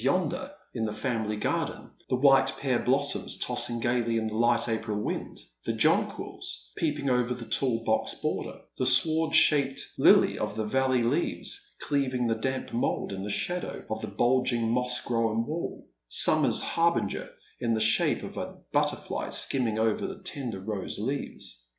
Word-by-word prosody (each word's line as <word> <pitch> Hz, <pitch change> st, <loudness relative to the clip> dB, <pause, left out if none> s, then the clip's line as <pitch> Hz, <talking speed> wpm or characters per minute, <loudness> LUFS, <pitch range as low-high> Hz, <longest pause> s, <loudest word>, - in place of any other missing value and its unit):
yonder 180 Hz, -, 0 dB, 0.2 s
in 115 Hz, -3 st, -2 dB
the 105 Hz, -, -3 dB
familiar 110 Hz, -3 st, -2 dB
garden, 105 Hz, -, -2 dB, 0.2 s
the -, -, +2 dB
white 135 Hz, 0 st, +5 dB
pear 130 Hz, -3 st, 0 dB
blossoms 140 Hz, +3 st, 0 dB
tossing 120 Hz, -1 st, 0 dB
gaily 115 Hz, 0 st, 0 dB
in 110 Hz, -, -1 dB
the 110 Hz, -, -3 dB
light 120 Hz, +1 st, +2 dB
April 110 Hz, -2 st, -2 dB
wind, -, -, -4 dB, 0.3 s
the -, -, -1 dB
jonquils -, -, -1 dB
peeping 150 Hz, -3 st, -1 dB
over 125 Hz, -1 st, +1 dB
the 120 Hz, -1 st, -8 dB
tall 115 Hz, -3 st, 0 dB
(box 110 Hz, -1 st, 0 dB
border, -, -, -4 dB, 0.2 s
the 130 Hz, -, +1 dB
sword 160 Hz, +5 st, +4 dB
shaded 140 Hz, -3 st, +4 dB, 0.2 s
lil)' -, -, +5 dB
of -, -, -3 dB
the 110 Hz, 0 st, -2 dB
valley 130 Hz, +1 st, +1 dB
leaves 175 Hz, -, -1 dB
cleaving 130 Hz, -4 st, 0 dB
the 115 Hz, -, +2 dB
damp 130 Hz, +4 st, -3 dB
mould 115 Hz, -, -1 dB
in 95 Hz, -, -5 dB
the 100 Hz, -, -5 dB
shadow 175 Hz, -, -3 dB
of -, -, -3 dB
the -, -, -4 dB
bulging 120 Hz, -2 st, +1 dB
moss 125 Hz, +1 st, +1 dB
grown 115 Hz, -1 st, 0 dB
wall, 160 Hz, +5 st, -5 dB, 0.4 s
Bummer's -, -, +4 dB
harbinger 170 Hz, 0 st, 0 dB, 0.3 s
in 115 Hz, -1 st, 0 dB
the -, -, 0 dB
shape 110 Hz, +1 st, +2 dB
of -, -, -8 dB
a -, -, -5 dB, 0.2 s
butterfly -, -, -1 dB
skimming 120 Hz, -5 st, +1 dB
over 110 Hz, -1 st, 0 dB
bhe 190 Hz, -, -9 dB
tender 125 Hz, -, -4 dB
rose 95 Hz, -1 st, -4 dB
leaves. 105 Hz, -, -5 dB
125 Hz, 165 wpm, -28 LUFS, 115-135 Hz, 0.4 s, white